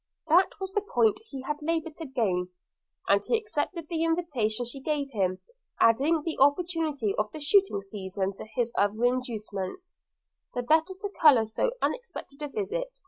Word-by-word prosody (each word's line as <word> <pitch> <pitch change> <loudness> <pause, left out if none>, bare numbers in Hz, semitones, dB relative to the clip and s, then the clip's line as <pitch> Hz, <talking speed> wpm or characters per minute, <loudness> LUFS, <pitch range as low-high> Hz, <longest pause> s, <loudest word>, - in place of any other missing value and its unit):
That 355 +4 +4
was 385 0 -5
the 415 - +1
point 235 - +2
he 270 -2 -7
had 295 +2 -3
laboured 325 0 -1
to 325 - -6
gain, 195 -9 0 0.6
and 200 0 +4
he 460 - +2
accepted 345 -6 -3
the 330 -1 -1
invitation 285 -10 0
she 270 +3 -6
gave 285 -1 -1
him, 185 -5 0 0.4
adding 285 +8 +4
the 325 -1 -3
opportunity 285 - +2
of 210 0 0
the 310 - -7
shooting 300 - +3
season 195 -1 -3
to - - -8
his 240 -2 0
other 210 +4 +2
inducements, 245 - -3 0.6
the 245 - -1
better 320 +8 +3
to 410 -1 -4
colour 265 -8 +7
so 225 - -1
unexpected 475 - -4
a 295 - -2
visit. 455 - -3
285 Hz, 165 wpm, -28 LUFS, 220-335 Hz, 0.6 s, colour